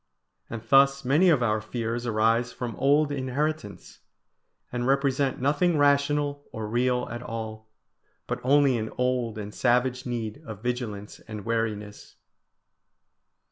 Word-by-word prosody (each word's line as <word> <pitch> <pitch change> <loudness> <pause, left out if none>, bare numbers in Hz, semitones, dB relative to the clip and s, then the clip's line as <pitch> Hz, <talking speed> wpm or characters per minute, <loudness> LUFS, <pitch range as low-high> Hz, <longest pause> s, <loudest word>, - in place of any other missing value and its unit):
And 115 -1 -6
thus 135 0 +5
many 155 +8 +4
of 145 -7 +3
our 110 -2 +1
fears 115 +2 -3
arise 115 +2 +2
from 120 -4 -5
old 145 +2 +3
inheritance, 135 - -3 0.7
and 120 0 -2
represent 135 0 +1
nothing 150 +5 +2
rational 145 0 +2
or 110 -2 -5
real 125 +2 0
at 120 0 -5
all, 110 -1 -6 0.6
but - - -3
only 135 -2 +4
an 110 0 -3
old 125 -3 0
and 105 -1 -6
savage 125 +2 +1
need 120 +2 -4
of 110 -6 -9
vigilance 115 -5 -4
and 105 -3 -7
wariness. 110 -3 -3
125 Hz, 130 wpm, -26 LUFS, 110-140 Hz, 0.7 s, thus